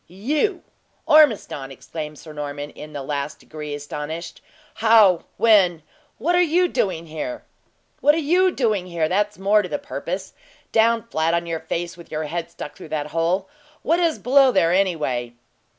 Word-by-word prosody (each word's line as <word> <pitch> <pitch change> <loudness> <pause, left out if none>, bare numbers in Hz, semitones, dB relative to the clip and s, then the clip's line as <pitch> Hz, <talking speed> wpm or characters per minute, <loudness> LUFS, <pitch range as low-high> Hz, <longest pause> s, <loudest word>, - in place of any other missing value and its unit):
"You, 295 - -1 0.4
Ormiston!" 230 - +4
exclaimed 150 +3 -7
Sir 155 +1 -11
Norman, 145 0 -5
in 150 - -10
the 145 -2 -6
last 140 +1 -3
degree 150 -1 -7
astonished. 150 +3 -6 0.3
"How 215 -6 +5
when 190 -8 +4 0.3
what 325 +10 0
are 355 - +5
you 355 +2 +3
doing 180 - -1
here?" 165 - -5 0.6
"What 295 +1 +4
are - - -1 0.2
you 370 +1 +5
doing 215 - 0
here? 170 -3 0
that's 205 +4 0
more 200 +3 +3
to 180 - -6
the - - -1
purpose. 285 +1 -5 0.4
Down 230 +1 +3
flat 165 -7 0
on 170 0 -1
your 165 -1 -3
face, 170 +2 -4
with 170 - -13
your 155 0 -2
head 170 +2 -4
stuck 160 - -8
through - - -11
that 150 -1 -3
hole. 175 +4 0 0.4
What 335 +2 +2
is 335 -3 +1
below 270 +1 +4
there, 170 -7 +3
anyway?" 150 -11 0
175 Hz, 165 wpm, -22 LUFS, 155-230 Hz, 0.6 s, How